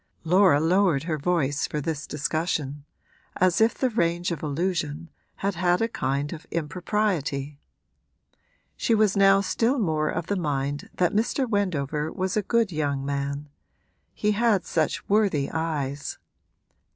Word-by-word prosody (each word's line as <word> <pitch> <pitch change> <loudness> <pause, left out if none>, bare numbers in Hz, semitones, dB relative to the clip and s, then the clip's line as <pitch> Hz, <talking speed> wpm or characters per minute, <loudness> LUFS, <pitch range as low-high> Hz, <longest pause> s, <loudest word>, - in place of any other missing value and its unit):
Laura 180 -2 +5
lowered 170 -2 +3
her 155 -2 -2
voice 145 -3 0
for 150 - -3
this 155 0 -3
discussion, 150 -2 -2 0.5
as 185 +1 +3
if 225 +1 +4
the 260 -2 0
range 175 -4 0
of 165 - -4
allusion 160 0 -2 0.2
had 200 +1 -1
had 175 0 +2
a 225 - +1
kind 140 - -2
of 160 - -10
impropriety. 155 -4 -2 1.2
She 230 - +1
was 210 -2 +3
now 195 0 +5
still 225 +7 +1
more 155 -8 0
of 165 0 -2
the 205 - -1
mind 145 -4 -2
that 180 -2 +1
Mr. 235 +5 +1
Wendover 160 - -1
was 185 0 -2
a 215 - +2
good 225 0 +1
young 145 -4 -1
man 140 +1 -3 0.7
he 210 - +1
had 210 -2 +2
such - - -1
worthy 200 -9 +2
eyes. 145 -4 -3
170 Hz, 140 wpm, -25 LUFS, 145-195 Hz, 1.2 s, Laura